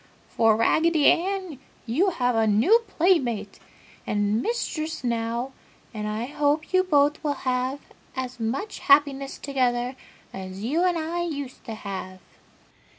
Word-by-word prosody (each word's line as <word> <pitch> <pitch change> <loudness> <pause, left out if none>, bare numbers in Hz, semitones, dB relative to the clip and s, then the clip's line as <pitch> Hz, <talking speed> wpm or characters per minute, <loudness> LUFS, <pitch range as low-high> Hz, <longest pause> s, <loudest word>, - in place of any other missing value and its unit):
For, 225 -2 +3
Raggedy 315 +6 +3
Ann, 370 -4 +2 0.3
you 300 - +2
have 250 -8 0
a 225 -1 +3
new 230 - +5
playmate 325 - +1 0.5
and 205 +2 +1
mistress 320 - -3
now, 235 +2 -1 0.4
and 210 -1 -4
I 215 +2 -2
hope 295 +4 0
you 370 0 +5
both 295 -4 +2
will 290 -2 0
have 255 +2 0 0.4
as 255 -1 -5
much 255 - -3
happiness 280 -1 +3
together 250 -2 -1 0.4
as 190 +1 -7
you 305 +10 +1
and 355 -2 +2
I 330 +2 -2
used 285 -6 -5
to 225 -3 -5
have!" 190 -3 -6
270 Hz, 135 wpm, -25 LUFS, 230-320 Hz, 0.5 s, new